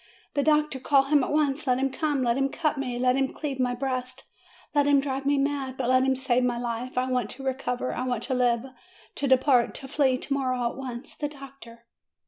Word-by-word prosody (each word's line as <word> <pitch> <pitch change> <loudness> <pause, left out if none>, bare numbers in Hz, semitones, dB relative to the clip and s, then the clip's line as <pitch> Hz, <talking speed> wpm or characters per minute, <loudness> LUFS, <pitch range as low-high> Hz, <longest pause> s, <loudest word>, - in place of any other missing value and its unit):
The 285 - +1
doctor! 300 -2 +2
Call 270 +1 +4
him 285 0 +3
at - - -2
once! 295 -1 +1
let 250 -1 +3
him 270 +1 0
come, 290 -2 -1
let 235 -1 +2
him 270 +1 +1
cut 305 +2 -1
me, 250 -3 -3
let 250 +1 +2
him 270 0 0
cleave 280 -4 -5
my 250 -1 +1
breast, 255 0 -3 0.5
let 290 -1 +3
him 285 -1 +5
drive 275 0 -3
me 285 0 +3
mad; 275 -2 -1
but 250 -2 -1
let 255 0 +5
him 265 0 +2
save 255 -1 +1
my 245 -1 0
life! 240 +1 -4
I 255 0 +1
want 250 -4 -1
to 270 - -8
recover; 255 -1 -2
I 250 - -3
want 245 -3 -1
to 265 - -2
live, 245 -1 +2 0.5
to 280 - -2
depart, 260 -2 +3
to 270 - -7
flee, 265 -2 +2
to 275 - -3
morrow, 255 -3 0
at - - -11
once! 255 -2 -6
The 295 - -3
doctor 270 -5 -13
265 Hz, 230 wpm, -26 LUFS, 250-275 Hz, 0.5 s, him